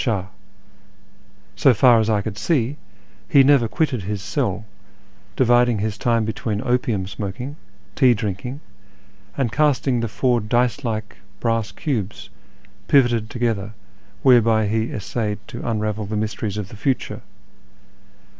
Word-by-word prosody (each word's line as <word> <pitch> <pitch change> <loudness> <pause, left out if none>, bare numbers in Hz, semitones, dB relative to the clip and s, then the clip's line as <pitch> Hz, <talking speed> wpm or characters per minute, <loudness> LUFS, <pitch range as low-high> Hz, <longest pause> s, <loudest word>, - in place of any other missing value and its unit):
So 130 -4 +4
far 120 +1 +6
as 110 0 +1
I 105 -2 +1
could 100 -1 -5
see, 135 +2 0 0.5
he 140 - +6
never 135 -4 +4
quitted 140 -3 -1
his 100 +2 -3
cell, 105 -1 -2 0.7
dividing 120 -2 +4
his 105 0 -2
time 115 -1 +1
between 110 -1 -3
opium 120 -5 0
smoking, 100 +8 -6 0.4
tea 125 -3 +4
drinking, 105 +7 -4 0.8
and 130 -5 0
casting 135 -2 +2
the 115 - -1
four 120 +4 +1
dice 120 +5 0
like 110 -3 -4 0.2
brass 115 -2 0
cubes 115 - -4 0.6
pivoted 120 -5 +3
together 110 -4 -2 0.5
whereby 115 -4 +5
he 110 +2 -1
essayed 105 0 -3
to 120 - -5
unravel 105 -1 -2
the 105 +1 -3
mysteries 105 -1 -3
of 100 -3 -4
the - - -10
future. 130 +3 -2
115 Hz, 125 wpm, -21 LUFS, 105-125 Hz, 0.8 s, far